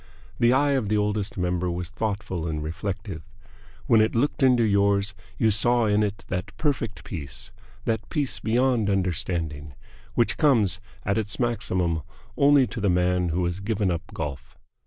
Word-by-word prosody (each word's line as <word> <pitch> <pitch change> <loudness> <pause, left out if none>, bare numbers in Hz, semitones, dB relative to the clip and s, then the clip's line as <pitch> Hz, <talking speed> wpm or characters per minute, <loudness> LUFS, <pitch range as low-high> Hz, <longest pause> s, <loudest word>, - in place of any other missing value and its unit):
The 120 0 +5
eye 140 +3 +3
of 130 -7 0
the 105 - +2
Oldest 105 +1 -1
Member 90 0 0
was 85 0 -4
thoughtful 100 -5 -3
and 75 -1 -3
reflective. 95 +2 -4 0.6
When 115 -2 +5
it 110 - +1
looked 140 +6 0
into 125 -3 +5
yours 100 -1 +2 0.2
you 110 - +3
saw 120 +3 +3
in 105 0 +3
it 105 -1 -2
that 90 -1 -4
perfect 135 -8 -1
peace, 70 - -6 0.3
that 110 -1 -1
peace 145 -5 -1
beyond 120 -2 +2
understanding, 85 -6 -2 0.4
which 120 - +2
comes 110 - +3 0.3
at 100 +2 +1
its 105 -2 -3
maximum 95 -9 0 0.3
only 140 -1 +5
to 115 - -6
the 100 - +2
man 90 0 +2
who 90 +2 0
has 90 +2 -2
given 100 -2 0
up 85 -1 -1
golf. 70 -6 -6
100 Hz, 160 wpm, -25 LUFS, 90-115 Hz, 0.6 s, The